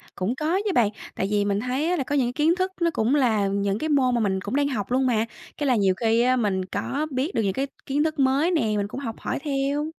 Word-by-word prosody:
cũng 200 +7 -1
có 320 +7 0
chứ, 405 - +1
bạn. 225 -7 +3 0.3
Tại 190 - -1
vì 205 -1 +2
mình 200 0 0
thấy 260 +7 -1
á, - - +2
là 275 - 0
có 290 - -2
những 265 - +3
cái 245 - -3
kiến 315 +5 +2
thức 370 0 -1
nó 335 - +3
cũng 235 +6 +1
là 220 -7 +2
những 200 +1 -1
cái 315 - -2
môn 260 -4 +3
mà - - +1
mình 190 -2 0
cũng 205 +7 -4
đang 285 0 +2
học 230 -5 -3
luôn 260 +1 +2
mà. 225 -3 +2 0.3
Cái 290 - -1
là 255 - +4
nhiều 195 -4 +3
khi 230 0 +2
á, 255 +1 +3
mình 195 -6 0
có 270 +11 -3
biết 270 +8 -2
được - - +2
những 195 -1 0
cái 275 +4 -1 0.2
kiến 285 +2 +1
thức 315 -1 -2
mới 275 +6 +3
nè, 325 - +2 0.2
mình 200 0 -1
cũng 255 - -6
học 230 -5 -5
hỏi - - -3
theo. 285 +1 -1
255 Hz, 290 wpm, -24 LUFS, 210-290 Hz, 0.3 s, là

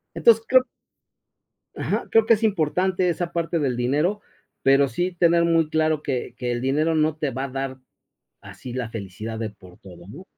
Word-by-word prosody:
Entonces 225 -1 +4
creo 255 -1 +5 1.1
Ajá, - - -2
creo 225 -1 +4
que 230 - +6
es 215 - -5
importante 185 -2 +1
esa 175 0 -2
parte 170 0 -1
del 135 -5 -1
dinero, 150 +12 0 0.4
pero 135 +1 +4
sí 175 +9 -2
tener 170 -1 +3
muy 165 -2 +2
claro 155 -1 +1
que 125 -4 -3
que 125 0 -3
el 120 0 -2
dinero 150 +5 +1
no 155 0 +1
te 150 -2 -2
va 130 +1 -4
a - - -4
dar 135 0 -4 0.6
así 125 - -10
la 125 -2 -3
felicidad 110 +1 -6
de 110 -1 -3
por 90 -3 -17
todo, 90 -2 -14
¿no? 165 - -11
150 Hz, 185 wpm, -23 LUFS, 125-170 Hz, 1.1 s, que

